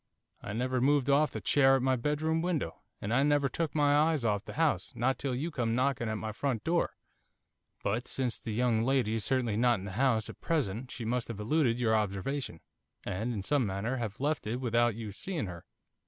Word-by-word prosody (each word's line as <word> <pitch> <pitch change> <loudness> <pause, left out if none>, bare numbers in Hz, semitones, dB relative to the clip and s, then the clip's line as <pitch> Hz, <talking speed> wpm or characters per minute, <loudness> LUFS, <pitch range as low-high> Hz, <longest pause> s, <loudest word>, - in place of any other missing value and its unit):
I 100 - -5
never 125 +2 0
moved 140 0 +3
off 150 +2 +4
the - - -5
chair 135 -2 +4
at 130 - 0
my 130 0 +3
bedroom 150 +5 0
window, 165 - -2 0.2
and 105 +3 -3
I 130 - +4
never 145 -1 +3
took 160 +4 -3
my 145 -1 +4
eyes 155 -3 +2
off 105 -2 0
the - - -7
house, 160 -2 +1
not 130 +2 0
till 135 -3 -1
you 155 +7 -2
come 115 -5 0
knocking 130 -3 +1
at 110 - -2
my 110 +1 -4
front 115 -1 -2
door.' 170 +1 0 0.9
'But, 110 +5 -1
since 125 -3 -2
the 115 - -5
young 115 0 +2
lady 130 -3 +1
is 110 -2 -1
certainly 120 -5 +1
not 120 0 +4
in 95 - -7
the 100 - -5
house 115 0 +1
at - - -11
present, 130 - -1
she 120 - -6
must 120 +1 -1
have 115 -3 -6
eluded 120 +1 +1
your 110 -2 +3
observation, 105 - -2 0.4
and, 110 +7 -2
in 105 -5 -3
some 145 +5 +2
manner, 105 +5 -2
have 110 -4 -4
left 145 -5 -1
it 110 - -1
without 120 -2 +1
your 110 -2 -6
seeing 160 - -3
her. 90 -2 -8
125 Hz, 215 wpm, -31 LUFS, 110-140 Hz, 0.9 s, off